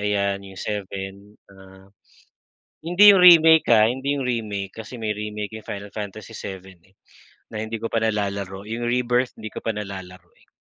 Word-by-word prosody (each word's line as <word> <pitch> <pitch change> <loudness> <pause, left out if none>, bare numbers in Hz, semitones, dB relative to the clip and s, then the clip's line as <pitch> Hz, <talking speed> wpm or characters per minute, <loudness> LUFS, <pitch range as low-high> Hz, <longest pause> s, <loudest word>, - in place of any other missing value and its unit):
ayan 100 -1 0
yung 95 -1 -13
7 100 0 -6 0.2
ah. 95 0 -17 0.9
Hindi 180 +5 +7
yung - - +4
remake 160 -2 +8
ah, 110 0 +5
hindi 135 +3 -2
yung 140 - -2
remake 105 -5 -3
kasi 125 - -9
may 110 - -1
remake 105 -1 -5
'yung 110 - -16
Final 100 0 -7
Fantasy 105 -1 -8
7 95 -2 -7 0.2
eh, 95 +1 -28 0.5
na 110 - -9
hindi 110 0 -5
ko 115 - -3
pa - - -3
nalalaro, 100 -3 -2
yung 115 +2 -4
Rebirth 125 +1 +1
hindi 110 - -6
ko - - -6
pa 115 - 0
nalalaro 95 -4 -8
eh. - - -27
105 Hz, 175 wpm, -23 LUFS, 100-115 Hz, 0.9 s, remake